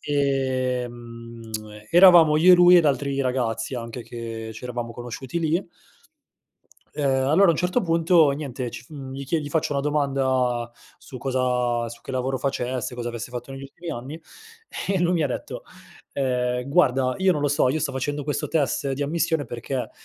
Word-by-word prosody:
ehm, 125 -4 -2 0.4
eravamo 175 -3 +7
io 175 +4 +7
e - - +10
lui 180 0 +7
ed 170 - +5
altri 140 -1 0
ragazzi, 125 -1 -2
anche 115 0 -6
che 115 -1 -7
ci 110 - -10
eravamo 120 -1 -4
conosciuti 120 +5 -6
lì. 165 +3 0 1.2
Ehm, 135 -3 0
allora 190 +6 +5
a - - +7
un - - -3
certo 180 +9 +1
punto 165 -2 +4
niente, 135 -4 -4
ci 115 - -9
f - - -26
mhmm, 135 -3 -8
gli 140 +1 -6
chie 160 +4 0
gli 145 - -6
faccio 155 -1 -1
una 140 - 0
domanda 130 -5 0 0.3
su 130 - -11
cosa 125 -2 0
su 120 +1 -11
che - - -8
lavoro 130 +1 -1
facesse, 130 -2 -2
cosa 120 -1 -4
avesse 120 0 -6
fatto 125 +1 -7
negli 135 0 -8
ultimi 160 +5 -8
anni 140 +4 -7 0.7
e 195 -1 +1
lui 175 0 +2
mi 160 -4 +1
detto, 125 - -6 0.5
ehm: 125 -1 -1
"Guarda 130 -5 +2
io 190 0 +3
non 150 -4 -2
lo 145 - +2
so, 145 -2 +2
io 155 +5 0
sto 145 -3 -2
facendo 145 +2 -3
questo 145 0 -2
test 140 -3 0
di 140 +2 -2
ammissione 160 +1 0
perché, 125 +2 -4
135 Hz, 180 wpm, -24 LUFS, 125-150 Hz, 1.2 s, e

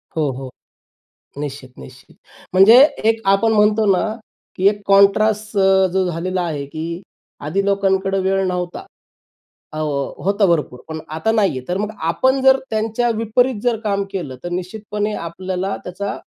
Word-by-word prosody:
हो, 155 -3 0
हो. 130 0 -7 0.9
निश्चित-निश्चित. 130 -3 -9 0.4
म्हणजे 195 +6 +7 0.3
एक 225 0 0
आपण 220 +3 +2
म्हणतो 210 0 +3
ना 185 - +2 0.5
की 190 +2 +2
एक 205 0 -5
कॉन्ट्रास्ट 210 +2 +3
अ, 190 -1 +4
जो 190 -1 +1
झालेला 180 +2 -2
आहे 150 -4 -4
की 165 +4 -6 0.5
आधी 195 +6 0
लोकांकडे 195 -1 +1
वेळ 195 +1 +1
नव्हता. 180 -1 -4 0.9
अ - - -6
हो 145 -3 -2
होतं 200 +1 +2
भरपूर 150 -7 0
पण 160 0 -6 0.2
आता 160 +8 0
नाहीये 195 - +1
तर 180 - -1
मग 210 +2 -3 0.2
आपण 260 +9 +1
जर 265 0 +6
त्यांच्या 220 +2 -1
विपरीत 230 +1 0
जर 235 -3 0
काम 200 -2 0
केलं 160 -10 -5
तर 175 - -4
निश्चितपणे 210 +4 -4
आपल्याला 185 +2 -4
त्याचा 200 +3 -5
195 Hz, 145 wpm, -19 LUFS, 170-210 Hz, 0.9 s, म्हणजे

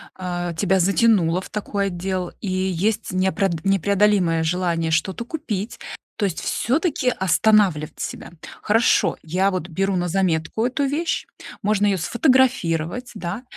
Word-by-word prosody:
а, 175 -2 -4
тебя 190 +3 +1
затянуло 190 -3 +3
в - - -11
такой 200 -1 -2
отдел 185 0 -3
и 200 - -4
есть 190 +3 -1
неопред 185 -2 0
непреодолимое 195 -3 +2
желание 165 -1 0
что-то 185 +7 0
купить, 230 - -5 0.4
то 210 - 0
есть 185 -4 -3
всё-таки 280 0 0
останавливать 190 -6 +2
себя. - - -6 0.3
Хорошо, 225 +2 +2
я 185 +5 +1
вот 185 -2 -4
беру 195 +3 -1
на 175 0 -1
заметку 180 +3 0
эту 255 +3 -1
вещь. 320 +4 -1 0.4
Можно 205 0 +1
её 195 - +2
сфотографировать, 240 - +1
да, 195 +5 -5
190 Hz, 135 wpm, -22 LUFS, 175-215 Hz, 0.4 s, затянуло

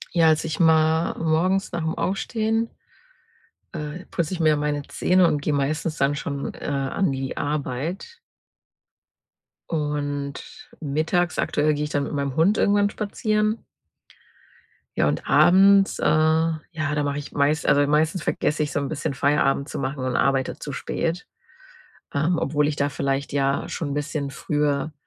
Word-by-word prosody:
Ja, 165 -1 +5
also, 155 0 +3
ich 160 -1 -4
ma 160 0 +3
morgens 175 +5 +1
nach 170 -1 -3
'm 160 +1 -2
Aufstehen, 225 +3 -1 1.0
äh, 155 +2 -6
putze 170 +2 -2
ich 175 - -6
mir 155 -1 +4
meine 145 0 -1
Zähne 185 0 +3
und 150 -3 +1
gehe 145 +1 -1
meistens 155 +3 -1
dann 140 +1 +1
schon, 140 -1 -4
äh, - - -14
an 140 +5 0
die 135 0 -4
Arbeit 150 - -3 1.5
und 145 -2 -2 0.5
mittags 160 +4 0
aktuell 150 +1 +1
gehe 150 0 -2
ich - - -6
dann 145 -1 0
mit - - -5
meinem 140 -2 -2
Hund 190 +7 +3
irgendwann 205 0 +3
spazieren. 215 +1 -1 1.3
Ja, - - +3
und - - -2
abends, 195 +2 +5
äh, - - -2
ja, 160 +1 +2 0.3
da 150 -1 0
mache 145 0 -2
ich 145 0 -7
meist 145 +2 +1
also, 145 0 +4
meistens 155 +4 +1
vergesse 155 0 -1
ich 150 - -1
so - - 0
'n 140 -1 -3
bisschen, 155 -2 -3
Feierabend 140 +1 +1
zu - - -5
machen, 135 0 -3
und 130 -1 -1
arbeite 135 -1 +1
zu 145 - -6
spät, 165 +5 -3 0.9
ähm, 160 +4 +1
obwohl 150 -1 +1
ich 150 - -2
da 145 - +1
vielleicht, 140 0 -2
ja, 140 0 0
schon 160 - -4
'n - - -2
bisschen 145 -1 -3
früher 145 +2 -1
150 Hz, 160 wpm, -23 LUFS, 145-170 Hz, 1.5 s, Ja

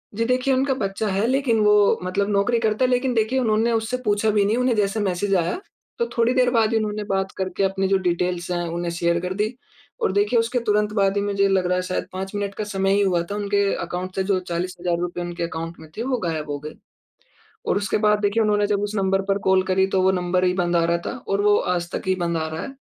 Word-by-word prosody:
जी 230 +2 0
देखिए 255 +2 +1
उनका 265 +1 +2
बच्चा 205 -3 -2
है 200 +2 0
लेकिन 260 -3 +1
वो 210 - +6 0.3
मतलब 200 +3 -1
नौकरी 205 +4 +2
करता 220 +2 +1
है - - +1
लेकिन 250 +1 +1
देखिए 225 +3 +1
उन्होंने 225 -1 +2
उससे 225 +2 -1
पूछा 210 +1 +2
भी 210 -1 +3
नहीं, 215 +3 +1
उन्हें 250 -1 +2
जैसे 205 0 0
मैसेज 195 0 0
आया। 175 - 0 0.4
तो 470 - +2
थोड़ी 235 +1 +3
देर 255 -1 +3
बाद 225 -3 +2
ही 225 - +2
उन्होंने 215 -1 -2
बात 190 0 0
करके 190 0 -2
अपनी 195 0 0
जो 195 0 +3
डिटेल्स 175 0 -1
हैं 175 -1 -1
उन्हें 170 +1 -3
शेयर 170 0 0
कर 180 +1 -3
दी। 210 +5 -2 0.5
और - - +2
देखिए 205 +4 +2
उसके 230 +2 0
तुरंत 210 -2 0
बाद 195 -2 +2
ही - - +2
मुझे 200 -1 +1
लग 190 -2 +1
रहा 180 - +1
है 180 - 0
शायद 185 0 -3
5 190 +1 -5
मिनट 200 -1 -2
का 215 - -3
समय 195 -1 0
ही 200 - +3
हुआ 185 -4 +2
था - - -2
उनके 200 0 0 0.2
अकाउंट 180 +2 -5
से 190 - 0
जो 190 -1 +1
₹40,000 175 0 -2
उनके 175 0 -4
अकाउंट 165 0 -5
में 160 -1 -13
थे 225 - -2
वो 255 0 0
गायब 155 -2 -3
हो 145 0 -3
गए। 150 +2 -8 0.9
और - - +1
उसके 205 0 0
बाद 210 0 +3
देखिए 205 +2 +2
उन्होंने 205 -1 +2
जब 205 -1 0
उस 205 +1 -3
नंबर 195 -1 +1
पर 195 0 +1
कॉल 190 0 +4
करी 190 0 +2
तो 190 - +3
वो 190 +1 +4
नंबर 180 0 0
ही 180 - +2
बंद 175 -2 0
आ 170 - +3
रहा 170 0 +1
था, - - -2 0.2
और 195 +1 +1
वो 205 0 +4
आज 175 -1 -1
तक - - -3
ही 185 - +2
बंद 170 -2 -1
आ 160 0 -2
रहा 160 +1 -5
है। 275 - -8
195 Hz, 255 wpm, -22 LUFS, 180-215 Hz, 0.9 s, वो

